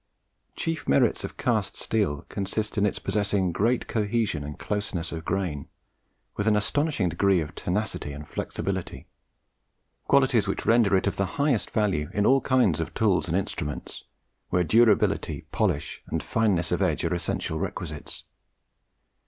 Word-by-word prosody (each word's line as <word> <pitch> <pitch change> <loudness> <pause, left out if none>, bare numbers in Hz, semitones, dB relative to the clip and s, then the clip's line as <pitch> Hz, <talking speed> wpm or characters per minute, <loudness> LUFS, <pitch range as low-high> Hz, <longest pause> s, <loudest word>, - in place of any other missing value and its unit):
Chief 165 -2 -3
merits 70 - +3
of - - -6
cast - - 0
steel 100 -11 -1
consist 105 +2 -3
in 105 -1 +3
its - - -2
possessing 100 -3 0
great 115 +8 +1
cohesion 105 -7 0
and 75 +1 -7
closeness 95 -5 -3
of 80 -1 -5
grain, 85 -6 -2 0.7
with 100 - -1
an 110 - +4
astonishing 140 - +1
degree 95 +2 +3
of 75 -2 -4
tenacity 95 -6 -2
and 75 +2 -8
flexibility, 95 -2 -4 1.0
qualities 130 -6 +4
which 100 - -2
render 115 -4 +4
it 95 - +2
of 100 - -1
the 100 - +1
highest 140 -6 +1
value 95 -9 0
in 105 0 +2
all 135 +1 +5
kinds 125 - +3
of - - -4
tools - - +2
and - - +1
instruments 75 0 -4 0.4
where 90 - +2
durability, 110 +3 +3
polish, 70 - -1
and - - -2
fineness 95 -7 +1
of - - 0
edge - - +1
are - - 0
essential - - -2
requisites. 80 -4 -5
100 Hz, 150 wpm, -26 LUFS, 85-110 Hz, 1.0 s, all